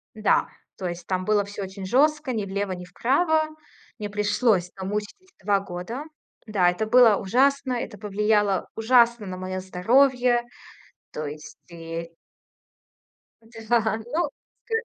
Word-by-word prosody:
Да, 215 Hz, -1 st, +2 dB, 0.3 s
то 185 Hz, -, -5 dB
есть 175 Hz, 0 st, -7 dB
там 185 Hz, -1 st, -1 dB
было 210 Hz, 0 st, +2 dB
всё 200 Hz, 0 st, -7 dB
очень 190 Hz, 0 st, -7 dB
жестко: 295 Hz, +5 st, +2 dB
ни 215 Hz, -4 st, -2 dB
влево, 200 Hz, 0 st, -3 dB
ни 180 Hz, -1 st, -6 dB
вправо. 310 Hz, -, +1 dB, 0.5 s
Мне 210 Hz, -2 st, -5 dB
пришлось, 205 Hz, -2 st, +1 dB
намучались 210 Hz, -, -5 dB
2 200 Hz, 0 st, +2 dB
года. 195 Hz, +9 st, -6 dB, 0.4 s
Да, 195 Hz, -5 st, +2 dB
это 200 Hz, +5 st, -3 dB
было 230 Hz, -2 st, +6 dB
ужасно, 265 Hz, +7 st, +2 dB
это 235 Hz, -3 st, -5 dB
повлияло 210 Hz, -1 st, +1 dB
ужасно 235 Hz, -1 st, +3 dB
на 185 Hz, -1 st, -5 dB
мое 185 Hz, 0 st, -4 dB
здоровье, 245 Hz, +6 st, +3 dB, 0.7 s
то 155 Hz, -, -5 dB
есть 150 Hz, +1 st, -8 dB
и 165 Hz, 0 st, -6 dB, 1.6 s
Да, 225 Hz, -2 st, +2 dB
ну 310 Hz, +5 st, 0 dB, 0.4 s
к -, -, -29 dB
210 Hz, 135 wpm, -25 LUFS, 185-245 Hz, 1.6 s, было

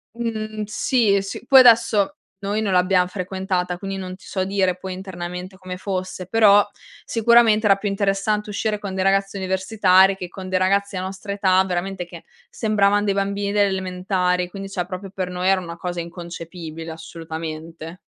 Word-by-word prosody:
Mhmm, 215 Hz, -2 st, -3 dB
sì, 210 Hz, -2 st, +2 dB
s 195 Hz, +4 st, -7 dB
poi 270 Hz, -1 st, +8 dB
adesso 230 Hz, -1 st, +5 dB, 0.2 s
noi 205 Hz, +2 st, -2 dB
non 200 Hz, -3 st, -1 dB
l'abbiam 180 Hz, 0 st, +3 dB
frequentata, 185 Hz, -1 st, -2 dB
quindi 195 Hz, 0 st, -4 dB
non 185 Hz, -1 st, -6 dB
ti 185 Hz, -, -18 dB
so 190 Hz, -1 st, -2 dB
dire 190 Hz, -2 st, 0 dB
poi 185 Hz, 0 st, -6 dB
internamente 180 Hz, 0 st, -7 dB
come 185 Hz, -1 st, -7 dB
fosse, 185 Hz, -1 st, -4 dB
però 205 Hz, -1 st, +6 dB, 0.4 s
sicuramente 230 Hz, -1 st, +4 dB
era 200 Hz, -1 st, +6 dB
più 205 Hz, +1 st, -2 dB
interessante 200 Hz, +1 st, 0 dB
uscire 210 Hz, +1 st, -1 dB
con 200 Hz, -2 st, -5 dB
dei 190 Hz, -, -1 dB
ragazzi 195 Hz, +1 st, +1 dB
universitari 190 Hz, 0 st, +3 dB
che 185 Hz, -2 st, -6 dB
con 185 Hz, +1 st, -9 dB
dei 185 Hz, 0 st, +1 dB
ragazzi 200 Hz, +1 st, +1 dB
dell 185 Hz, 0 st, -3 dB
nostra 195 Hz, +1 st, -6 dB
età, 190 Hz, -2 st, +3 dB
veramente 180 Hz, 0 st, -3 dB
che 170 Hz, -1 st, -12 dB, 0.3 s
sembravan 205 Hz, -1 st, +2 dB
dei 200 Hz, -, +2 dB
bambini 200 Hz, 0 st, -1 dB
delle 205 Hz, -1 st, +3 dB
elementari, 180 Hz, -1 st, -1 dB
quindi 195 Hz, +1 st, -7 dB
cioè 180 Hz, -2 st, -3 dB
proprio 185 Hz, +1 st, -7 dB
per 185 Hz, -2 st, -3 dB
noi 180 Hz, +1 st, -2 dB
era 190 Hz, -1 st, +3 dB
una 170 Hz, -1 st, -8 dB
cosa 175 Hz, 0 st, -4 dB
inconcepibile, 170 Hz, -1 st, -7 dB
assolutamente. 160 Hz, +1 st, -7 dB
190 Hz, 170 wpm, -22 LUFS, 180-200 Hz, 0.4 s, poi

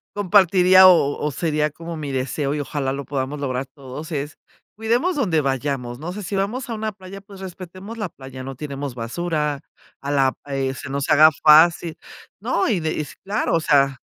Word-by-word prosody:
compartiría 185 Hz, -2 st, +6 dB
o 145 Hz, -6 st, +4 dB
o 150 Hz, -, 0 dB
sería 150 Hz, 0 st, -1 dB
como 165 Hz, +2 st, -8 dB
mi 145 Hz, -2 st, -5 dB
deseo 135 Hz, +2 st, -2 dB
y 150 Hz, -, -2 dB
ojalá 140 Hz, -2 st, -2 dB
lo 140 Hz, 0 st, -5 dB
podamos 140 Hz, +1 st, -3 dB
lograr 130 Hz, -1 st, -2 dB
todos 140 Hz, +3 st, -10 dB
es, 145 Hz, +1 st, -4 dB, 0.4 s
cuidemos 240 Hz, +11 st, +1 dB
donde 180 Hz, -, +1 dB
vayamos, 135 Hz, -3 st, -2 dB
no 175 Hz, +3 st, -5 dB
sé, 210 Hz, +1 st, -7 dB
si 200 Hz, -, -5 dB
vamos 220 Hz, +7 st, -2 dB
a 230 Hz, -, -3 dB
una 215 Hz, 0 st, -3 dB
playa, 195 Hz, 0 st, -11 dB
pues, 200 Hz, 0 st, -14 dB
respetemos 190 Hz, +4 st, -9 dB
la 205 Hz, -4 st, -3 dB
playa, 130 Hz, -3 st, -10 dB
no 135 Hz, -1 st, -7 dB
tiremos 140 Hz, -2 st, -5 dB
basura, 150 Hz, +4 st, -2 dB, 0.4 s
a 140 Hz, -, -5 dB
la 135 Hz, -2 st, +3 dB
eh, 135 Hz, -1 st, -2 dB
se 130 Hz, +3 st, -8 dB
nos 140 Hz, 0 st, -2 dB
haga 155 Hz, +1 st, +7 dB
fácil, 160 Hz, +2 st, +6 dB, 0.4 s
¿no?, 220 Hz, -2 st, 0 dB
y 195 Hz, -7 st, +1 dB
de 160 Hz, 0 st, -1 dB
y 155 Hz, -, -2 dB, 0.2 s
claro, 200 Hz, -2 st, -1 dB
o 165 Hz, -, +3 dB
sea 140 Hz, -3 st, +2 dB
155 Hz, 190 wpm, -22 LUFS, 140-185 Hz, 0.4 s, haga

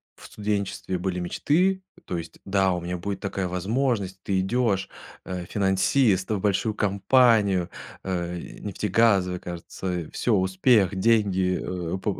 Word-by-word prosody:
в -, -, -15 dB
студенчестве 100 Hz, -3 st, -2 dB
были 90 Hz, 0 st, -2 dB
мечты, 180 Hz, -, +1 dB, 0.2 s
то 90 Hz, -, -3 dB
есть: 85 Hz, -, -8 dB
"Да, 95 Hz, -1 st, +2 dB
у 90 Hz, -, -2 dB
меня 90 Hz, +1 st, -4 dB
будет 100 Hz, +2 st, -4 dB
такая 95 Hz, -1 st, -2 dB
возможность!" 95 Hz, 0 st, -1 dB
Ты 95 Hz, -2 st, 0 dB
идешь, 100 Hz, -1 st, +1 dB, 0.4 s
э, 90 Hz, -1 st, -5 dB
финансист, 95 Hz, +1 st, +2 dB
э, -, -, +2 dB
в -, -, -2 dB
большую 105 Hz, +2 st, +1 dB
компанию, 100 Hz, -2 st, +3 dB, 0.3 s
э, 90 Hz, -2 st, -2 dB, 0.2 s
нефтегазовая, 100 Hz, -3 st, +2 dB
кажется, 90 Hz, 0 st, -5 dB
всё: 115 Hz, -3 st, +1 dB
успех, 95 Hz, +2 st, +3 dB
деньги, 95 Hz, -3 st, +2 dB, 0.4 s
э, -, -, -2 dB
по 95 Hz, +1 st, -2 dB
95 Hz, 140 wpm, -25 LUFS, 90-105 Hz, 0.4 s, компанию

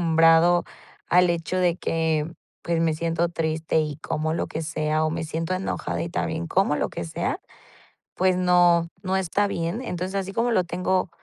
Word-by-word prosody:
malacostumbrado 165 Hz, +1 st, +5 dB, 0.4 s
al 180 Hz, +1 st, +4 dB
hecho 170 Hz, +1 st, -1 dB
de 175 Hz, -2 st, +2 dB
que, 160 Hz, -2 st, -1 dB, 0.3 s
pues, 170 Hz, -1 st, 0 dB
me 165 Hz, -1 st, +2 dB
siento 165 Hz, +1 st, 0 dB
triste 160 Hz, -1 st, 0 dB
y 150 Hz, -2 st, -4 dB
como 155 Hz, 0 st, -2 dB
lo 165 Hz, -, -1 dB
que 160 Hz, -, -5 dB
sea, 155 Hz, -1 st, 0 dB
o 155 Hz, -, +1 dB
me 165 Hz, 0 st, -3 dB
siento 165 Hz, +2 st, -3 dB
enojada 185 Hz, +1 st, -2 dB
y 170 Hz, -, -3 dB
también 165 Hz, 0 st, -2 dB
como 185 Hz, -2 st, +2 dB
lo -, -, 0 dB
que -, -, -5 dB
sea, 80 Hz, -, -2 dB, 0.8 s
pues 185 Hz, 0 st, +2 dB
no, 175 Hz, -2 st, +4 dB
no 190 Hz, -1 st, 0 dB
está 190 Hz, +2 st, +1 dB
bien. 170 Hz, +3 st, -2 dB
Entonces, 185 Hz, -5 st, -4 dB
así 195 Hz, 0 st, -2 dB
como 235 Hz, +4 st, +1 dB
lo 185 Hz, -6 st, +2 dB
tengo 180 Hz, +1 st, 0 dB
170 Hz, 180 wpm, -24 LUFS, 160-180 Hz, 0.8 s, malacostumbrado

